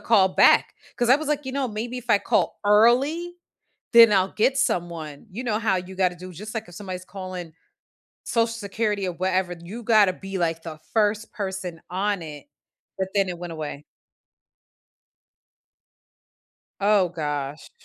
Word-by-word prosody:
call 200 -5 +4
back - - +5 0.2
'cause 240 - +1
I 255 - +8
was, 305 0 -5
like, 295 -2 -1
"You 260 - -4
know, 270 -1 -1
maybe 230 +3 -4
if 245 -2 -6
I 205 - +6
call - - 0
early 265 +12 +3 0.6
then 230 -2 +9
I'll 190 -1 +2
get 260 +5 +2
someone," 170 - -2
you 235 +7 -5
know 220 -4 0
how 210 -4 +1
you 185 +1 -7
gotta 180 -2 +1
do 185 +1 -10
just 210 +7 -8
like 220 -3 -4
if 175 - -13
somebody's 185 -2 -7
calling 185 -4 -7 0.7
Social 230 -1 +2
Security 210 -1 -2
or 180 - -3
whatever, 185 +1 0
you 210 +8 -8
gotta 215 -4 +5
be 195 +1 -6
like 165 -1 -1
the 155 -2 -8
first 215 0 +1
person 190 -4 -5
on 195 +1 -1
it, 150 -3 -9 0.5
but, 190 -1 -1
then 195 -2 +2
it 175 - -5
went 175 -1 -6
away. 150 -2 -6 3.0
Oh, 200 -2 +4
gosh. 145 -3 -4
195 Hz, 160 wpm, -24 LUFS, 175-225 Hz, 3.0 s, then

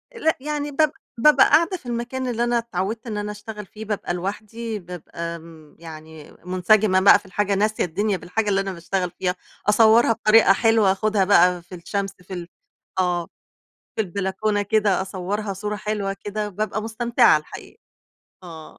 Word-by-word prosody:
لأ 320 -9 +1
يعني 295 0 -3
باب 305 +1 +2 0.3
بابقى 280 +3 +6
قاعدة 335 +5 +3
في 305 - -24
المكان 245 +2 -3
اللي 240 -1 -1
أنا 240 0 +1
اتعوّدت 225 0 -3
إن 215 -2 -4
أنا 210 0 -3
اشتغل 210 0 -8
فيه، 215 +3 -10
بابقى 205 -4 -3
لوحدي، 215 +4 -5
بابقى 170 -1 -7
م 160 -2 -16
يعني 160 -2 -11
مُنسجمة 185 +2 +3
بقى 200 +1 +7
في - - -22
الحاجة، 200 +2 -1
ناسية 215 +2 +1
الدنيا 200 +4 -1
بالحاجة 205 +5 -2
اللي 195 -1 +2
أنا 195 -1 -4
باشتغل 180 +1 -3
فيها، 180 -1 0 0.3
أصوّرها 225 +2 +5
بطريقة 215 -2 +5
حلوة، 225 -2 +3
آخُدها 205 +1 +1
بقى 180 -2 +4
في 175 +2 -11
الشمس 195 +3 -3
في 185 +1 -10
ال 175 -1 -6 0.5
آه، 175 -2 0 0.7
في 220 - +1
البلكونة 200 +2 -1
كده 205 -2 +1
أصوّرها 195 +2 -4
صورة 210 +2 -4
حلوة 205 -1 -3
كده، 210 0 -3
بابقى 215 +2 -3
مستمتعة 230 +2 +3
الحقيقة. - - -11 0.7
آه. 160 -3 -11
205 Hz, 165 wpm, -22 LUFS, 180-220 Hz, 0.7 s, بقى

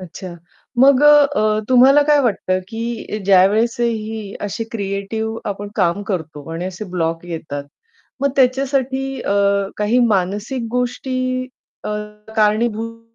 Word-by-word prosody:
अच्छा, 180 0 -9 0.4
मग 275 +1 +6
अ, 295 -1 +8
अ, 215 0 +2
तुम्हाला 265 +3 +6
काय 295 0 +4
वाटतं 190 -6 0
की 225 -1 -4
ज्यावेळेस 200 +5 +4
ही 220 -3 -2
अशी 205 +3 -3
क्रिएटिव्ह 220 +2 -3
आपण 205 0 -5
काम 185 +1 +1
करतो 160 -4 -5
आणि 170 +2 -4
असे 185 +3 -5
ब्लॉक 165 -1 -2
येतात, 155 -4 -5 0.6
मग 280 0 +2
त्याच्यासाठी 270 0 +1
अ, 200 - -1 0.4
काही 210 +4 +1
मानसिक 210 +5 -1
गोष्टी 250 +1 -2 0.7
अ, - - -3 0.5
कारणीभूत. 225 +1 +1
215 Hz, 125 wpm, -19 LUFS, 195-250 Hz, 0.7 s, अ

